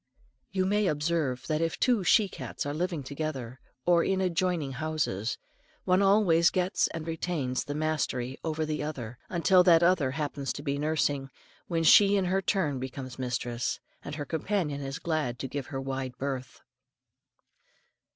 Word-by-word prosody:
You 190 -1 0
may 205 +1 +2
often - - +3
observe 145 -4 -1
that 155 +3 0
if 165 -1 -1
two 240 -6 +3
she 210 +3 +5
cats 185 - -6
are 145 - -2
living 170 -1 -2
together, 135 -3 -5 0.3
or 175 -1 +4
in 190 -1 +1
adjoining 180 -5 0
houses, 135 -7 -2 0.5
one 185 +1 +3
always 195 -5 +5
gets 185 +1 +1
and 160 -1 -6
retains 160 -6 -2
the 145 - -4
mastery 150 -5 -1
over 160 -1 -1
the 155 0 -2
other, 125 -6 -5
until 180 +1 +4
that 170 -2 +6
other 170 -6 +3
happens 140 -1 -3
to 145 - -7
be 140 0 -1
nursing, 145 -3 0 0.4
when 165 -2 0
she 200 +4 +7
in 195 -2 +2
her 190 +2 +1
turn 165 - 0
becomes 130 0 -6
mistress, 120 -1 -2 0.2
and 145 - -6
her 145 -1 -4
companion 160 -3 -1
is 135 0 -4
glad 155 -7 -1
to 135 - -4
give 140 0 -5
her 140 - -5
a - - -3
wide 135 -1 -4
berth. 130 -2 -4
155 Hz, 170 wpm, -29 LUFS, 135-175 Hz, 0.5 s, she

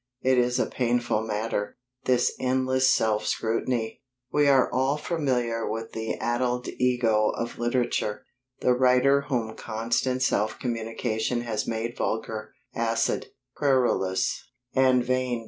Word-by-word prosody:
It 130 -1 +4
is 125 0 +2
a 130 - +2
painful 120 -3 0
matter, 105 -1 -3 0.3
this 125 -1 +2
endless 130 0 +2
self 110 -1 +2
scrutiny. 115 +1 -1 0.3
We 145 -1 +4
are 135 -2 +5
all 135 +3 +1
familiar 125 -8 -1
with 115 +1 -4
the 110 0 -3
addled 125 +1 -1
ego 120 -4 +3
of 115 - -4
literature 120 -3 -1 0.4
the 125 - +4
writer 130 +2 +4
whom 115 -5 -1
constant 120 +3 -1
self 110 -3 +1
communion 115 0 -2
has 115 -3 -3
made 115 +1 -3
vulgar, 110 -1 -3 0.2
acid, 115 0 0 0.3
querulous, 130 -5 +1 0.3
and 130 -2 +4
vain. 130 -1 0
120 Hz, 125 wpm, -26 LUFS, 110-130 Hz, 0.4 s, are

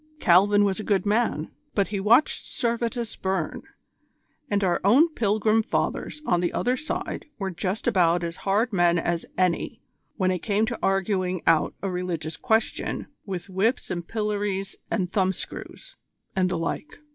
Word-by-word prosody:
Calvin 205 - +5
was 195 -1 +1
a - - -4
good 200 -3 +1
man, 205 -7 +1 0.2
but 200 -2 +2
he 200 -1 -2
watched 230 +9 +3
Servetus 235 -1 -2
burn, 190 -4 -2 0.9
and 205 -2 +1
our 180 -2 +1
own 255 - +6
Pilgrim 220 -4 +2
Fathers 300 +6 -2
on 175 -1 +2
the 175 - 0
other 250 +1 +1
side 305 +3 -4
were 195 -2 -3
just 185 +4 -3
about 175 -6 +3
as 170 0 -4
hard 210 +4 +1
men 175 -2 +4
as 170 0 -1
any 180 -2 0 0.4
when 185 -3 +2
it 180 - -1
came 210 +3 +1
to 235 +1 -4
arguing 190 -2 0
out 160 - +3
a 195 - -1
religious 175 -3 -3
question 220 +3 0 0.2
with 185 -1 -4
whips 200 +6 0
and 175 -1 -4
pillories 205 -3 -2
and 185 -5 -1
thumbscrews, 195 - -3 0.4
and 185 -1 +2
the 180 - -1
like. 235 - -4
195 Hz, 160 wpm, -25 LUFS, 180-220 Hz, 0.9 s, own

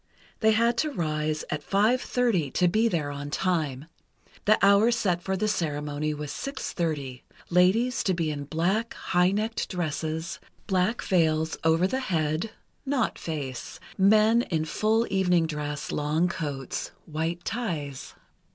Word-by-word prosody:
They 220 -1 +4
had 230 +2 +2
to 310 - +1
rise 155 - -1
at 150 - -2
five 215 - +2
thirty, 225 - +1
to 180 +7 +2
be 220 +6 +3
there 155 -9 -1
on 145 0 -6
time. 150 -5 -1 0.6
The 215 +1 +5
hour 200 +3 +6
set 195 -7 +1
for 190 +1 -2
the 215 +3 0
ceremony 150 -5 -1
was 150 -1 -5
six 275 0 -5
thirty—ladies 180 - 0
to 185 - +2
be 165 -2 -1
in 145 -1 -5
black, 185 +9 0
high 180 0 +2
necked 215 +3 -1
dresses, 160 -1 -3 0.3
black 190 +3 +1
veils 160 -3 +2
over 160 +2 +3
the 260 +8 0
head 165 - -1 0.3
(not 270 -3 0
face), 140 -6 -5 0.2
men 215 +4 +5
in 160 -9 -1
full 220 +7 +1
evening 180 -3 +3
dress, 150 -2 -4
long 150 +4 +1
coats, 145 -7 -4 0.2
white 165 +2 -3
ties. 155 - -4
175 Hz, 140 wpm, -27 LUFS, 155-215 Hz, 0.6 s, hour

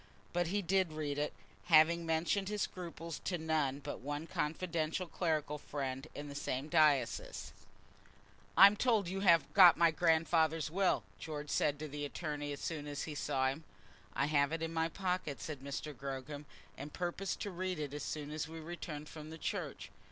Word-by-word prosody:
But 175 -1 +1
he 200 +4 0
did 185 -2 +2
read 145 -2 -2
it, 150 - 0 0.3
having 165 +1 +5
mentioned 170 +5 +1
his 210 -1 -1
scruples 170 -2 -6
to 180 - -2
none 155 -4 0
but 140 - -6
one 145 +4 -4
confidential 165 +2 -1
clerical 155 -4 -1
friend 135 -1 -4
in 145 - -6
the 140 - -7
same 140 0 -3
diocese. 145 -6 +2 1.0
"I'm 200 +2 +10
told 220 -3 +2
that 175 - -4
you 195 - -2
have 170 -4 +4
got 180 -4 +9
my 170 -1 +5
grandfather's 160 -1 +2
will," 190 +2 +2 0.2
George 150 -2 -5
said 145 -1 +2
to 155 +1 -5
the 145 0 -5
attorney 145 -1 -4
as 140 - -6
soon 150 -3 -3
as 145 -1 -3
he 155 - -5
saw 130 -2 +1
him. 145 +4 -5 0.5
"I - - +2
have 145 -1 +2
it 165 0 -2
in 165 0 -3
my 165 0 +1
pocket," 180 -6 -2
said 150 -3 -5
Mr. 140 +2 -5
Gogram, 140 +2 -6 0.3
"and 145 +2 -7
purpose 180 +3 -2
to 205 - -5
read 185 0 -3
it 145 -2 -4
as 145 - -4
soon 150 -1 -4
as 155 +1 -3
we 165 0 -8
return 160 -2 -6
from 155 +1 -9
church." - - -4
155 Hz, 180 wpm, -35 LUFS, 145-170 Hz, 1.0 s, I'm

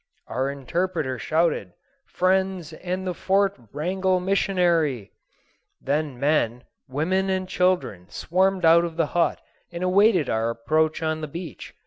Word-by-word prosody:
Our 130 +2 -2
interpreter 140 -1 -2
shouted, 165 +7 0 0.3
"Friends 185 -3 0
and 185 +3 -4
the 180 - -1
Fort 195 +2 +1 0.2
Wrangell 185 +5 0
missionary." 175 - +1 0.7
Then 145 -2 -2
men, 125 -5 +1 0.3
women, 185 +8 0
and 185 -1 -1
children 180 - 0
swarmed 185 +1 +1
out 165 +1 +6
of 165 -1 -5
the 165 - +3
hut, 175 -1 +1 0.3
and 170 +1 -5
awaited 185 - +4
our 115 +1 0
approach 155 +8 0
on 155 0 -1
the 155 - -4
beach. 165 -1 -8
170 Hz, 130 wpm, -24 LUFS, 145-185 Hz, 0.7 s, out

